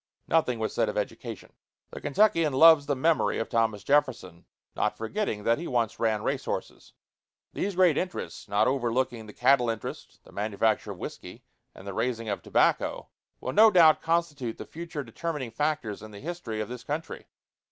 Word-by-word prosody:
Nothing 155 -7 +2
was 110 -1 -3
said - - +1
of - - -4
education. - - -5 0.4
The - - -8
Kentuckian 165 -2 +2
loves 155 0 +7
the 145 - +1
memory 160 +5 +1
of 115 - -3
Thomas 115 -3 0
Jefferson, 120 - 0 0.3
not 105 0 -1
forgetting 115 - -3
that 115 +4 +2
he 170 - -5
once 120 -4 -1
ran 110 -2 0
racehorses. - - -4 0.6
These 200 -1 -2
great 180 -5 +4
interests, 180 -1 -5
not 105 +2 +2
overlooking 120 -2 -1
the - - -9
cattle 125 -3 +3
interest, 115 -2 -6
the - - -17
manufacture 105 +1 0
of - - -6
whiskey, - - -8 0.3
and 95 - -13
the 100 - -5
raising 115 +1 -2
of 100 - -2
tobacco, - - +1 0.3
will 130 - -4
no 220 +1 +7
doubt 170 -6 +6
constitute 155 -8 -1
the - - -7
future 165 -3 -6
determining 135 +1 -5
factors 150 -8 -2
in 110 - -10
the 100 -1 -11
history 155 -8 -5
of 105 - -4
this 125 0 -8
country. 155 +3 -5
130 Hz, 175 wpm, -27 LUFS, 110-160 Hz, 0.6 s, loves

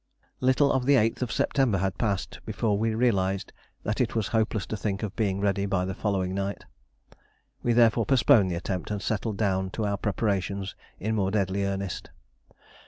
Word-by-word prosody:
Little 130 +2 +3
of 130 -1 0
the 140 - +6
8th 115 0 +1
September 125 -3 +2
had 95 0 -2
passed 100 -5 -1
before 105 -3 0
we 110 +2 0
realised 100 -5 +1 0.3
that 105 +4 -1
it 120 -2 0
was 110 -3 0
hopeless 110 -2 0
to - - -4
think 105 0 -3
of 105 0 -4
being 100 -4 0
ready 100 0 +1
by 90 -2 0
the 95 - -3
following 95 -2 -1
night. 100 +1 -3 1.0
We 120 - +1
therefore 115 -2 +4
postponed 115 -7 +5
the 90 - -1
attempt, 90 0 -3
and 105 -1 -2
settled 105 0 -2
down 95 -3 0
to 110 - 0
our 100 -1 0
preparations 100 -2 -1 0.3
in 110 +4 -1
more 100 -3 +1
deadly 100 -1 0
earnest. 100 -2 -3
100 Hz, 175 wpm, -27 LUFS, 95-115 Hz, 1.0 s, the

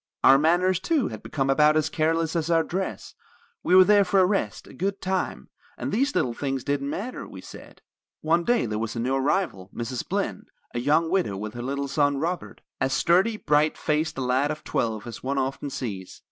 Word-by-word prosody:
Our 135 +1 +7
manners, 175 +4 +3
too, 290 - 0
had 110 -2 -8
become 135 -3 -2
about 150 +2 +4
as 155 0 +2
careless 160 +1 0
as 165 -1 -1
our 165 -1 +3
dress; 190 +3 -4 0.5
we 180 - +3
were 185 - +10
there 205 +1 +5
for 195 +1 +2
a 185 - +6
rest, 180 - -1
a - - -14
good 195 +7 -2
time, 190 -1 -3 0.3
and - - -4
these 275 +6 0
little 120 - +1
things 135 +1 -3
didn't 140 -1 -1
matter, 225 - -5
we - - -10
said. - - -13 0.4
"One 165 +2 +2
day 240 - +2
there 105 -1 -3
was 115 +1 -3
a - - -3
new 125 +3 0
arrival. 135 - 0
Mrs. 120 +1 -4
Blinn, - - -2 0.3
a 120 - -2
young 155 +6 +2
widow, 180 - 0
with 105 +2 -5
her 120 - -6
little 140 +3 -3
son, 145 0 +1
Robert, 170 +4 -4 0.2
as 135 - 0
sturdy, 185 +10 +3
bright 150 -4 +2
faced 155 0 -1
a - - -2
lad 130 +3 +1
of 155 0 -5
twelve 110 -1 -2
as 120 -2 -8
one 135 +2 -2
often 135 +2 -2
sees. 110 -9 -6
150 Hz, 210 wpm, -25 LUFS, 130-180 Hz, 0.5 s, were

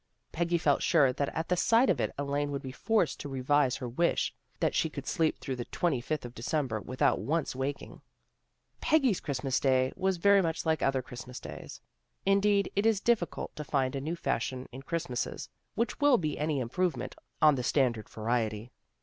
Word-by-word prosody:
Peggy 170 +1 +1
felt 145 -4 +2
sure 145 -7 +4
that 140 +2 -1
at 160 0 -2
the 180 - +2
sight 230 +8 +4
of - - +2
it - - 0
Elaine 145 +1 -1
would 140 -1 -4
be 130 - -5
forced 195 - 0
to 145 - -6
revise 135 0 +2
her 125 - -5
wish 170 +9 +1 0.3
that - - +1
she 160 - +1
could 140 -2 -7
sleep 160 -1 +1
through 135 - -4
the 120 - -4
twenty 160 -9 0
fifth 150 +1 -3
of 120 - -8
December 125 -2 -2
without 130 +4 +1
once 145 - -1
waking. 135 +2 -4 0.8
Peggy's 270 - +3
Christmas 135 -2 -1
day 130 -1 +2
was 190 -1 0
very 200 +3 +5
much 165 -2 -2
like 160 -1 +1
other 135 -1 +1
Christmas 125 0 -8
days. - - -9 0.4
Indeed 200 0 +3
it 200 +3 +3
is 220 -3 +3
difficult 215 -5 0
to 150 - -5
find 135 -2 0
a 135 - -2
new 160 +5 -2
fashion 130 -5 -2
in 130 - -8
Christmases, 150 -4 -3 0.3
which 235 +1 -1
will 290 -3 +5
be 155 -6 -2
any 150 -1 -1
improvement 165 +9 -2 0.2
on 155 -1 +6
the 130 - -1
standard 125 -4 +1
variety. 110 0 -2
145 Hz, 190 wpm, -30 LUFS, 130-170 Hz, 0.8 s, on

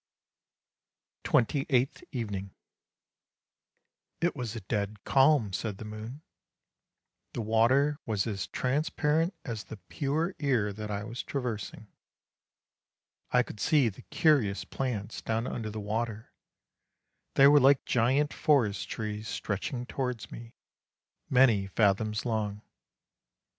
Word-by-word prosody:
" - - -61
TWENTY 135 +4 +2
EIGHTH 130 -1 +1
EVENING 100 -6 -4 0.8
" - - -64 0.7
It 175 +1 +1
was 120 -3 -4
a 115 - -5
dead 105 +1 -3
calm," 135 -7 +4
said 105 +1 -3
the 110 - -8
moon; 110 +7 -8 0.5
" - - -56
the 115 - -2
water 130 +7 +3
was 105 -3 0
as 100 -4 -3
transparent 155 +5 0
as 115 -5 -5
the 110 - -9
pure 145 - -2
air 125 -8 +1
that 105 +1 -6
I 100 0 -3
was 115 +3 -5
traversing. 120 -5 -4 1.4
I 125 0 +4
could 105 - -10
see 140 -3 +3
the 95 - -12
curious 130 -11 +2
plants 115 -5 -4
down 115 +1 -1
under 115 -4 -4
the 110 +1 -5
water, 110 +1 -3 1.0
they 135 - +7
were 145 +1 +7
like 135 0 +5
giant 130 +5 +2
forest 120 -9 +2
trees 105 0 -4
stretching 120 +6 -3
towards 125 -4 -4
me, 115 0 -10 0.7
many 120 -7 +4
fathoms 105 +2 +1
long. 105 -3 -2
115 Hz, 125 wpm, -29 LUFS, 105-135 Hz, 1.4 s, they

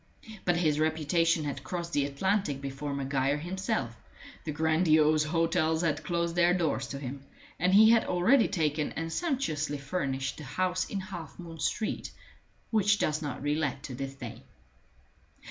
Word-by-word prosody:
But 175 - +3
his 155 -3 +2
reputation 160 +1 +2
had 145 -2 -4
crossed 170 -1 -4
the 145 -1 +2
Atlantic 150 0 0
before 140 +1 -5
Maguire 140 0 0
himself; 160 -8 -2 0.5
the 155 - -2
grandiose 155 0 +3
hotels 165 0 +1
had 155 -2 0
closed 170 0 -1
their 175 0 +4
doors 155 -7 0
to 140 - -5
him; 135 0 -6 0.4
and 180 +2 +2
he 220 +3 +8
had 230 -1 +4
already 205 +9 +4
taken 155 -5 -1
and 165 +1 -4
sumptuously 155 - -1
furnished 140 -2 -2
the 150 - -8
house 185 +7 -1
in 200 - -3
Half 180 -4 -8
moon 165 -2 -9
Street 215 +8 -2 0.6
which 210 -1 +3
does 155 -3 0
not 140 -3 -5
re 145 0 +1
let 145 -3 -2
to 135 - -6
this 135 +2 -5
day. 120 -3 -8
155 Hz, 160 wpm, -29 LUFS, 140-180 Hz, 0.6 s, he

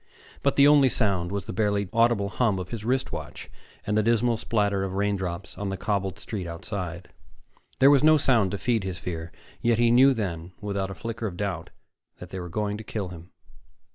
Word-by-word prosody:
But 140 - +1
the 140 0 +7
only 145 -3 +6
sound 95 -7 0
was 100 -2 -3
the - - -6
barely 100 0 0
audible 115 -3 +3
hum 110 -3 +1
of 90 -1 -5
his 115 -3 -5
wrist 130 +3 0
watch - - -7 0.3
and 105 - 0
the 110 - +4
dismal 115 +2 +2
splatter 105 -3 0
of 95 -1 -3
raindrops 95 -3 -2
on 100 -1 -2
the 95 - -3
cobbled 95 -2 -2
street 100 -3 -5
outside. 90 0 -5 0.7
There 135 +2 +7
was 140 -1 +4
no 155 0 +7
sound 120 -9 +3
to 100 - -3
feed 115 -1 0
his 95 -2 -4
fear, 85 -1 -5 0.3
yet 115 -1 +2
he 120 0 +4
knew 130 +3 +6
then, 90 -5 -4
without 100 -2 -3
a 95 - -6
flicker 115 -1 -4
of 90 -3 -7
doubt, 90 -5 -3 0.5
that 90 - -11
they 95 - -5
were 90 -1 -6
going 105 +3 -2
to - - -7
kill 105 -4 -4
him. 85 0 -11
100 Hz, 205 wpm, -26 LUFS, 95-115 Hz, 0.7 s, the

